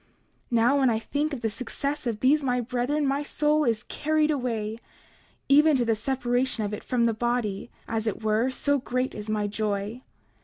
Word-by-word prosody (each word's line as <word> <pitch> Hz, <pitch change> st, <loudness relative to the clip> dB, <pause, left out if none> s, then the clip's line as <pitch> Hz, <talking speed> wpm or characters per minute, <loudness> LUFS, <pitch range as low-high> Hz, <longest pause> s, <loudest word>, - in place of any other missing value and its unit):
29:16 -, -, -37 dB, 0.4 s
Now, 240 Hz, +4 st, +3 dB
when 265 Hz, -2 st, +4 dB
I 225 Hz, -, +1 dB
think 290 Hz, +7 st, -2 dB
of 275 Hz, -5 st, -5 dB
the 225 Hz, -, 0 dB
success 275 Hz, +4 st, -3 dB
of 220 Hz, -3 st, -2 dB
these 290 Hz, +3 st, +4 dB
my 250 Hz, -2 st, +1 dB
brethren 250 Hz, +5 st, -1 dB
my 275 Hz, +1 st, +1 dB
soul 300 Hz, +1 st, +1 dB
is 225 Hz, -1 st, 0 dB
carried 310 Hz, +4 st, +1 dB
away, 225 Hz, -6 st, -2 dB, 0.7 s
even 295 Hz, +1 st, +6 dB
to 245 Hz, -, +1 dB
the 225 Hz, -1 st, +2 dB
separation 245 Hz, 0 st, 0 dB
of 205 Hz, -, -4 dB
it 210 Hz, -, -5 dB
from 240 Hz, -2 st, +1 dB
the 230 Hz, -, +2 dB
body, 235 Hz, -2 st, -2 dB, 0.2 s
as 225 Hz, 0 st, -2 dB
it 220 Hz, +1 st, -3 dB
were, 220 Hz, +4 st, +2 dB
so 285 Hz, +2 st, +1 dB
great 255 Hz, +1 st, -2 dB
is 210 Hz, 0 st, -7 dB
my 210 Hz, -1 st, 0 dB
joy. 210 Hz, +2 st, -2 dB
245 Hz, 195 wpm, -26 LUFS, 220-280 Hz, 0.7 s, even